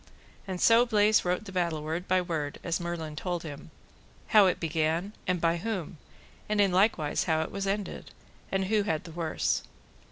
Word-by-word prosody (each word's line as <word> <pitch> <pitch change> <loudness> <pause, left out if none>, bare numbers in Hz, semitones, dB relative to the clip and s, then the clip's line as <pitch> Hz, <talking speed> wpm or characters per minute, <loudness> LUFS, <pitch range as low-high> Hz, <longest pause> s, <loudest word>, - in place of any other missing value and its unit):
And 185 -2 -4
so 230 +4 +6
Bleise 215 -2 +3
wrote 180 +4 -1
the 195 - -8
battle 170 -4 -1
word 160 +4 -3
by 185 0 +3
word, 155 -4 -3
as 170 -1 -1
Merlin 170 -3 -4
told 175 +1 -3
him, 150 -1 -8 0.6
how 210 -3 +7
it 180 - 0
began, 165 +4 -1
and 180 -1 +1
by 165 +1 +2
whom, 185 -5 -4 0.5
and 210 -1 +1
in 200 -2 +4
likewise 180 -5 +2
how 160 -2 +2
it - - -7
was 195 0 -3
ended, 200 +1 -3 0.4
and 195 0 +1
who 210 +2 +2
had 160 -6 -1
the 170 - -10
worse. 165 -1 -1
180 Hz, 185 wpm, -29 LUFS, 160-200 Hz, 0.6 s, how